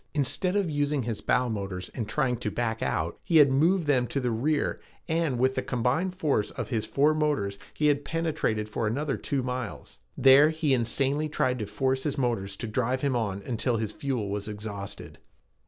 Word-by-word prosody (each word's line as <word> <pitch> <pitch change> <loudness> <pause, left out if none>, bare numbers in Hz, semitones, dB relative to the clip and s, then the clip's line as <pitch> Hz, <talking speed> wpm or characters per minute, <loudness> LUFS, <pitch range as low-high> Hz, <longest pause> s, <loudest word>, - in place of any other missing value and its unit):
Instead 165 +7 +1
of 200 -3 +2
using 145 -2 0
his 115 -2 -3
bow 125 +1 +2
motors 100 -5 -4
and 115 -4 -5
trying 130 +1 +1
to 115 -2 -3
back 115 0 -2
out, - - -1
he 165 - +3
had 145 -3 +7
moved 165 +6 +3
them 130 -4 +2
to 140 - -2
the 125 -2 -1
rear, 145 +7 0 0.3
and 160 -5 0
with 130 +2 +2
the 130 - -1
combined 130 +10 0
force 145 - 0
of - - -5
his 115 -4 -1
four 145 +3 +3
motors 130 -11 0 0.2
he 150 - 0
had 145 -1 +3
penetrated 150 -9 -1
for 110 +1 -2
another 135 +5 -1
two 140 -3 -2
miles. 125 -3 -5 0.2
There 135 +3 +7
he 155 -3 +1
insanely 135 +5 +1
tried 125 -4 0
to 105 - -3
force 130 +6 0
his 145 0 -2
motors 115 -7 -1
to 115 - -5
drive 125 +3 0
him 140 -3 +1
on 100 -4 -2
until 120 +1 0
his 110 -1 -2
fuel 130 -9 -3
was 100 +1 -3
exhausted. 105 -1 -7
130 Hz, 195 wpm, -27 LUFS, 110-145 Hz, 0.3 s, had